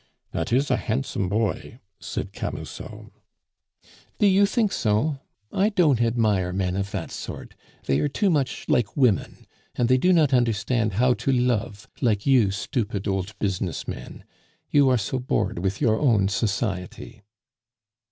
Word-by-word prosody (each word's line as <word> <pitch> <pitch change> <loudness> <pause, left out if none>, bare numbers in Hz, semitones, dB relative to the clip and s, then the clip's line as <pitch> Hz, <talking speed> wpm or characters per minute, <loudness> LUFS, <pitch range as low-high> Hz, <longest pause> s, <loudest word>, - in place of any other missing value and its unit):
"That - - -3
is 135 +3 +2
a 125 - +3
handsome 110 -3 -2
boy," 110 +3 -2 0.2
said - - -5
Camusot. - - -7 1.1
"Do - - +2
you 200 0 +5
think 215 -2 +1
so? 125 - 0 0.3
I 200 +3 +3
don't 155 - +3
admire 110 -6 +1
men 90 -1 -1
of 100 0 -2
that - - -5
sort; - - -7 0.3
they 70 - +1
are - - +1
too 195 +7 +1
much 145 -5 -1
like 115 +1 +1
women; 125 -8 +1 0.3
and 120 - +1
they 130 0 +4
do 180 - +3
not 155 -6 +4
understand 115 -2 +1
how 125 +5 +3
to 135 - -1
love 115 -5 0
like 105 -5 +1
you 125 -7 +4
stupid 100 0 -3
old 95 +1 -2
business 95 -4 -2
men. - - -8 0.5
You 140 -2 +5
are 130 - +4
so 115 +4 -2
bored 125 -7 -1
with 95 +2 -2
your 110 -6 +2
own 110 -9 +3
society." 100 0 -3
115 Hz, 150 wpm, -24 LUFS, 100-135 Hz, 1.1 s, you